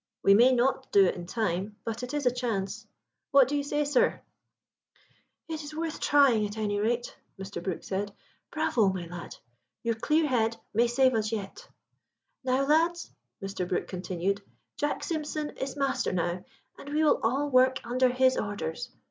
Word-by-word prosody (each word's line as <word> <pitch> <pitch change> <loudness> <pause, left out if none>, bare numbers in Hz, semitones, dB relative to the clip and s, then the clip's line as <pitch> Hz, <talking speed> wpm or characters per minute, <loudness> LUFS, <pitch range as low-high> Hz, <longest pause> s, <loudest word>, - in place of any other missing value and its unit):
We 195 - +7
may 240 +5 +6
not 260 +1 +1
do 200 -1 +6
it 180 - +2
in 175 -1 -8
time, 205 -1 -2
but 225 +1 -3
it 250 0 -5
is 295 -2 -2
a 250 - +5
chance. 220 -3 -3 0.4
What 275 -2 +6
do 290 - -2
you 290 - +1
say, 295 +1 -1
sir?" 285 -3 +2 1.3
"It 320 -2 -4
is 295 +1 -8
worth 325 0 -3
trying, 260 -7 +4
at 205 +2 -9
any 205 -1 -1
rate," 235 +3 -1 0.2
Mr. 195 +1 -6
Brook 185 -4 -4
said. 200 +1 -3 0.4
"Bravo, 250 -10 +2
my 185 -2 -3
lad! 175 0 -8 0.5
your 230 0 +1
clear 305 +8 +1
head 230 -3 +1 0.2
may 235 +3 +3
save 255 +2 +3
us 215 -1 0
yet. 200 -3 -6 0.7
"Now, 260 +1 +1
lads," 330 +4 +2 0.3
Mr. 195 -2 -3
Brook 180 - -1
continued, 185 +2 -2 0.3
"Jack 295 0 -2
Simpson 305 -2 -3
is 265 0 -4
master 275 -2 0
now, 175 0 -2 0.3
and 285 - -9
we 305 +2 +1
will 305 - +4
all 275 +6 0
work 255 0 +4
under 255 +2 +2
his 260 +1 +3
orders. 205 +2 -3
240 Hz, 175 wpm, -28 LUFS, 200-275 Hz, 1.3 s, We